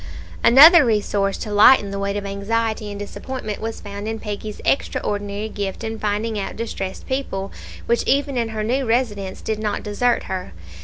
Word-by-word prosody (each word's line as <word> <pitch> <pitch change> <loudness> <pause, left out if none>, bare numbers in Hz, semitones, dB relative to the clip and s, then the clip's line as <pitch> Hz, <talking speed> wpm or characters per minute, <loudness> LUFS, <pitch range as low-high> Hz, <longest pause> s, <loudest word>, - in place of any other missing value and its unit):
Another 305 +7 +9
resource 205 -4 0
to 210 - -6
lighten 205 -1 +6
the 200 - -4
weight 200 0 -2
of 200 - -4
anxiety 215 +2 -2
and 205 - -6
disappointment 215 +1 -6
was 225 +1 -5
found 205 0 -7
in 225 0 -3
Peggy's 210 0 -6
extraordinary 205 -5 -1
gift 200 -1 -5
in 225 0 -4
finding 215 +1 -1
out 195 - -4
distressed 195 -4 -5
people, 230 -8 -3 0.3
which 235 - +2
even 280 0 +1
in 235 -2 0
her 215 -1 -3
new 255 +5 0
residence, 225 -6 -1
did 220 -1 -3
not 210 -1 -2
desert 235 +4 0
her. 185 - -5
215 Hz, 170 wpm, -21 LUFS, 200-230 Hz, 0.3 s, Another